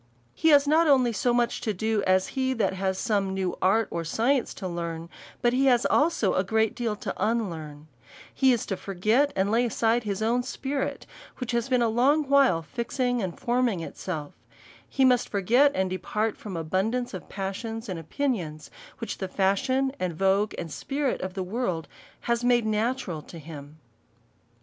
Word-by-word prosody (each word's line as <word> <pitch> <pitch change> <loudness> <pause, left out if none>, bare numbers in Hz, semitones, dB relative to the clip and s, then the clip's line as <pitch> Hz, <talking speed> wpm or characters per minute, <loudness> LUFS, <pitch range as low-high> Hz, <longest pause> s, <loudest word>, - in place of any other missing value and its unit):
He 320 - +2
has 290 -1 +6
not 320 +3 +4
only 260 -4 +4
as 210 - -4
much 240 -1 +1
to 215 -3 -2
do, 220 +2 0
as 185 0 +3
he 260 -1 0
that 225 -5 0
has 190 0 -1
som©' 200 -2 0
new 190 -2 -2
art 210 +4 +3
or 170 - -2
science 235 - +1
to 190 - -5
learn, 170 -1 -5 0.3
but 240 0 +3
he 270 +2 +3
has 245 -2 +4
also 295 - +2
a 185 - +2
great 220 +2 +1
deal 230 -3 -2
to - - -5
unlearn: 165 -10 -2 0.5
He 265 -1 +4
is 235 -3 0
to 195 - -2
forget, 215 +9 +1
and 195 +2 +1
lay 235 +2 +3
aside 230 0 +1
his 210 -1 -3
own 235 +3 +2
spirit, 270 +2 -3 0.3
which 250 -2 -4
has 235 +1 -1
been 250 -2 +3
a - - +3
long 265 +7 +3
while 270 -12 +4
fixing 245 - -2
and 185 -4 -4
forming 240 -6 +1
itself; 160 -3 -6 0.6
he 270 - +2
must 250 -2 +3
forget, 235 +9 +4
and 190 -1 0
depart 210 +4 -1
from 205 -4 -8
abun 185 +6 0
dance 245 0 -3
of 185 - -8
passions 220 +4 -5
and 185 -4 -4
opinions, 165 - -3 0.3
which 230 - -5
the 190 - -2
fashion, 260 +9 +1
and 180 -3 -2
vogue, 195 +4 +1
and 170 -2 -5
spirit 275 - -2
of 185 0 -5
the 190 - -2
world 185 - -2 0.3
has 235 0 0
made 240 -2 +3
natural 220 -5 -1
to 170 - -12
him. 150 -1 -10
220 Hz, 185 wpm, -26 LUFS, 185-250 Hz, 0.6 s, has